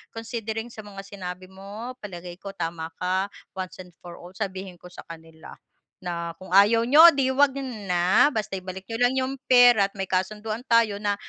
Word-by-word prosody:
considering 225 Hz, 0 st, -5 dB
sa 225 Hz, -, -13 dB
mga 200 Hz, -1 st, -10 dB
sinabi 185 Hz, -2 st, -8 dB
mo 200 Hz, +5 st, -8 dB
palagay 175 Hz, -2 st, -8 dB
ko 200 Hz, -, -8 dB
tama 165 Hz, -1 st, -4 dB
ka, 185 Hz, +2 st, 0 dB, 0.3 s
once 185 Hz, 0 st, -6 dB
and 180 Hz, -, -18 dB
for 175 Hz, -1 st, -11 dB
all 175 Hz, -, -12 dB
sabihin 190 Hz, -2 st, -5 dB
ko 180 Hz, -, -13 dB
sa -, -, -11 dB
kanila 160 Hz, -1 st, -12 dB, 0.5 s
na 170 Hz, -1 st, -4 dB
kung 185 Hz, -1 st, -12 dB
ayaw 215 Hz, +4 st, +6 dB
niyo 315 Hz, +6 st, +9 dB
'di 265 Hz, -1 st, +1 dB
'wag 280 Hz, -1 st, +3 dB, 0.3 s
na, 180 Hz, +11 st, +4 dB
basta 215 Hz, -5 st, -3 dB
ibalik 185 Hz, +1 st, -9 dB
niyo 225 Hz, -, -3 dB
lang 245 Hz, +1 st, +3 dB
yung 260 Hz, +1 st, -2 dB
pera 245 Hz, -5 st, +6 dB
at -, -, -35 dB
may 190 Hz, -, -2 dB
kasunduan 215 Hz, +5 st, -2 dB
tayo 230 Hz, -3 st, +3 dB
na, 205 Hz, -1 st, +1 dB
195 Hz, 185 wpm, -25 LUFS, 180-225 Hz, 0.5 s, niyo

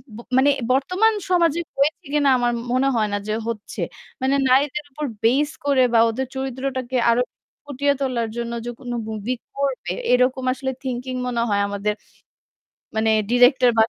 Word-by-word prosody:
ব -, -, -9 dB, 0.2 s
মানে 275 Hz, +2 st, +5 dB, 0.2 s
বর্তমান 365 Hz, +12 st, +3 dB, 0.2 s
সমাজে 340 Hz, -2 st, +3 dB, 0.2 s
হয়েছে 300 Hz, +5 st, +1 dB
কিনা 290 Hz, -2 st, +3 dB
আমার 240 Hz, 0 st, +1 dB, 0.2 s
মনে 260 Hz, +2 st, +2 dB
হয় 215 Hz, -2 st, +2 dB
না -, -, +1 dB
যে 215 Hz, -, -1 dB
হচ্ছে। 225 Hz, -3 st, -5 dB, 0.4 s
মানে 265 Hz, +1 st, +2 dB
নারীদের 280 Hz, +3 st, +2 dB
উপর 300 Hz, +2 st, -4 dB, 0.2 s
base 285 Hz, +6 st, +2 dB
করে 275 Hz, -2 st, +3 dB
বা 230 Hz, -, +6 dB
ওদের 260 Hz, +3 st, -3 dB
চরিত্রটাকে 260 Hz, -1 st, -3 dB
আরও 235 Hz, +1 st, +4 dB, 0.4 s
ফুটিয়ে 285 Hz, 0 st, +1 dB
তোলার 245 Hz, -4 st, -1 dB
জন্য 235 Hz, 0 st, -3 dB
যে -, -, -3 dB
কোন 245 Hz, -2 st, -7 dB, 0.2 s
movie 220 Hz, +3 st, -3 dB, 0.2 s
করবে 265 Hz, -10 st, -1 dB, 0.2 s
এরকম 255 Hz, +1 st, +3 dB
আসলে 265 Hz, 0 st, -3 dB
thinking 255 Hz, 0 st, -3 dB
মনে 235 Hz, -1 st, -1 dB
হয় 200 Hz, 0 st, +2 dB
আমাদের 205 Hz, +1 st, -1 dB, 1.0 s
মানে 220 Hz, 0 st, +2 dB, 0.2 s
director 250 Hz, +1 st, +5 dB
বা 220 Hz, -, +7 dB
260 Hz, 160 wpm, -22 LUFS, 235-275 Hz, 1.0 s, বা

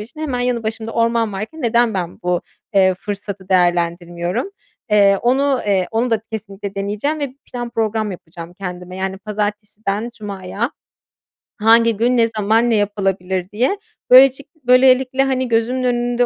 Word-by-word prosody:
için 240 Hz, +9 st, -10 dB
hemen 270 Hz, -6 st, -2 dB
yanı 245 Hz, -2 st, 0 dB
başımda 220 Hz, +1 st, -4 dB
orman 230 Hz, -1 st, +1 dB
varken 220 Hz, +11 st, -6 dB
neden 235 Hz, -1 st, +2 dB
ben 175 Hz, -3 st, -3 dB
bu, 180 Hz, 0 st, 0 dB, 0.3 s
eee, 190 Hz, -1 st, +5 dB
fırsatı 200 Hz, 0 st, -6 dB
değerlendirmiyorum? 175 Hz, -, 0 dB, 0.4 s
Eee, 200 Hz, -1 st, +5 dB
onu 265 Hz, +2 st, +2 dB
eee, 190 Hz, -3 st, +2 dB
onu 230 Hz, +2 st, 0 dB
da 225 Hz, -, +2 dB
kesinlikle 200 Hz, -2 st, -6 dB
deneyeceğim 210 Hz, +10 st, -2 dB
ve 275 Hz, -3 st, -3 dB, 0.2 s
plan 240 Hz, -1 st, -4 dB
program 220 Hz, -2 st, -1 dB
yapacağım 170 Hz, -1 st, -10 dB
kendime, 180 Hz, -1 st, -7 dB
yani, 190 Hz, 0 st, -3 dB
"Pazartesiden 210 Hz, +1 st, -3 dB
cumaya 205 Hz, +3 st, -4 dB, 0.9 s
hangi 230 Hz, 0 st, +5 dB
gün, 245 Hz, +2 st, +2 dB
ne 230 Hz, -1 st, +4 dB
zaman, 220 Hz, +3 st, +2 dB
ne 230 Hz, -, +3 dB
yapılabilir?" 195 Hz, -3 st, -1 dB
diye. 250 Hz, -, +1 dB, 0.3 s
Böylecik 265 Hz, +5 st, +6 dB
böylelikle, 260 Hz, -1 st, +4 dB
hani, 260 Hz, -1 st, 0 dB
gözümün 240 Hz, +3 st, 0 dB
önünde 245 Hz, 0 st, +1 dB
220 Hz, 145 wpm, -19 LUFS, 195-245 Hz, 0.9 s, Böylecik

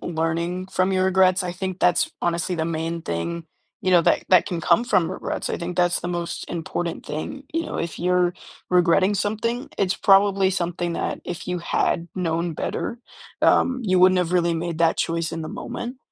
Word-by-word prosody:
learning 170 Hz, +2 st, -2 dB
from 185 Hz, 0 st, +1 dB
your 185 Hz, 0 st, +2 dB
regrets 190 Hz, -1 st, +4 dB
I 180 Hz, -, -3 dB
think 185 Hz, 0 st, -5 dB
that's 175 Hz, -1 st, +2 dB
honestly 175 Hz, +1 st, 0 dB
the 160 Hz, -2 st, -1 dB
main 165 Hz, 0 st, -3 dB
thing, 160 Hz, -, -3 dB, 0.4 s
you 185 Hz, -, 0 dB
know, 175 Hz, -2 st, +6 dB
that -, -, +2 dB
that 185 Hz, -2 st, +5 dB
can 175 Hz, -5 st, -3 dB
come 235 Hz, +8 st, +3 dB
from 180 Hz, -8 st, +2 dB
regrets, -, -, -4 dB
I -, -, -1 dB
think 175 Hz, +1 st, -5 dB
that's 175 Hz, -1 st, +2 dB
the -, -, -6 dB
most 175 Hz, -1 st, -4 dB
important 170 Hz, 0 st, -4 dB
thing, 270 Hz, -, -5 dB
you 330 Hz, 0 st, -1 dB
know, -, -, -5 dB
if 165 Hz, -1 st, -4 dB
you're 180 Hz, 0 st, +2 dB, 0.4 s
regretting 180 Hz, +2 st, +4 dB
something, 220 Hz, +5 st, -2 dB
it's 190 Hz, -1 st, +1 dB
probably 195 Hz, -1 st, +4 dB
something 175 Hz, -2 st, -2 dB
that -, -, -3 dB
if 175 Hz, +1 st, -6 dB
you 180 Hz, 0 st, -1 dB
had 170 Hz, 0 st, 0 dB
known 170 Hz, -2 st, -1 dB
better, 235 Hz, -, -3 dB, 0.4 s
um, 260 Hz, 0 st, +3 dB
you 185 Hz, -4 st, +2 dB
wouldn't 185 Hz, 0 st, +6 dB
have 180 Hz, -1 st, 0 dB
really 170 Hz, -2 st, +2 dB
made 165 Hz, 0 st, -3 dB
that 165 Hz, -1 st, +3 dB
choice 165 Hz, -1 st, -1 dB
in 165 Hz, -1 st, -4 dB
the 155 Hz, -, -5 dB
moment. 245 Hz, +2 st, -6 dB
175 Hz, 195 wpm, -23 LUFS, 170-190 Hz, 0.4 s, know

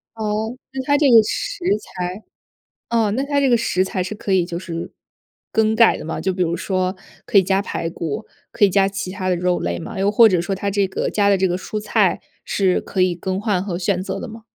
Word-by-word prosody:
哦， 220 Hz, +2 st, -2 dB, 0.2 s
那 265 Hz, -, -2 dB
它 285 Hz, +1 st, +3 dB
这 285 Hz, -3 st, +4 dB
个 225 Hz, -1 st, +9 dB
食 455 Hz, -, -4 dB
材 185 Hz, 0 st, -6 dB, 0.7 s
啊， 225 Hz, -3 st, +2 dB
那 260 Hz, +6 st, -1 dB
它 285 Hz, 0 st, 0 dB
这 275 Hz, -, +3 dB
个 240 Hz, -, +5 dB
食 185 Hz, -4 st, +1 dB
材 185 Hz, -1 st, -2 dB
是 190 Hz, +4 st, -5 dB
可 205 Hz, -1 st, -3 dB
以 180 Hz, -2 st, +3 dB
就 170 Hz, -1 st, -4 dB
是 170 Hz, -2 st, -6 dB, 0.6 s
更 220 Hz, 0 st, +2 dB
改 230 Hz, 0 st, +5 dB
的 -, -, -8 dB
吗？ 160 Hz, -, -4 dB
就 190 Hz, +3 st, 0 dB
比 180 Hz, 0 st, -1 dB
如 170 Hz, 0 st, 0 dB
说 185 Hz, +1 st, -1 dB, 0.3 s
可 -, -, -1 dB
以 -, -, +6 dB
加 190 Hz, +1 st, +1 dB
排 165 Hz, -, -3 dB
骨， 165 Hz, +6 st, -4 dB, 0.3 s
可 205 Hz, -, +3 dB
以 195 Hz, -, +4 dB
加 195 Hz, +1 st, +3 dB
其 195 Hz, -2 st, -5 dB
它 185 Hz, 0 st, -4 dB
的 180 Hz, -, +2 dB
肉 180 Hz, 0 st, +1 dB
类 85 Hz, 0 st, -2 dB
吗？ -, -, -7 dB
又 200 Hz, +1 st, +2 dB
或 225 Hz, +1 st, +7 dB
者 180 Hz, -4 st, +2 dB
说 195 Hz, +3 st, -2 dB
它 200 Hz, +1 st, -2 dB
这 200 Hz, -1 st, +1 dB
个 190 Hz, -, -2 dB
加 205 Hz, -1 st, +2 dB
的 200 Hz, -, +4 dB
这 190 Hz, 0 st, +1 dB
个 175 Hz, -, 0 dB
蔬 210 Hz, +3 st, -5 dB
菜 210 Hz, -, +1 dB, 0.2 s
是 190 Hz, -2 st, +1 dB
可 190 Hz, -, -4 dB
以 180 Hz, -1 st, +2 dB
更 185 Hz, +3 st, -3 dB
换 205 Hz, -4 st, 0 dB
和 185 Hz, -4 st, -3 dB
选 185 Hz, 0 st, 0 dB
择 195 Hz, 0 st, -4 dB
的 -, -, -6 dB
吗？ 225 Hz, 0 st, -11 dB
195 Hz, 265 characters per minute, -20 LUFS, 185-215 Hz, 0.7 s, 个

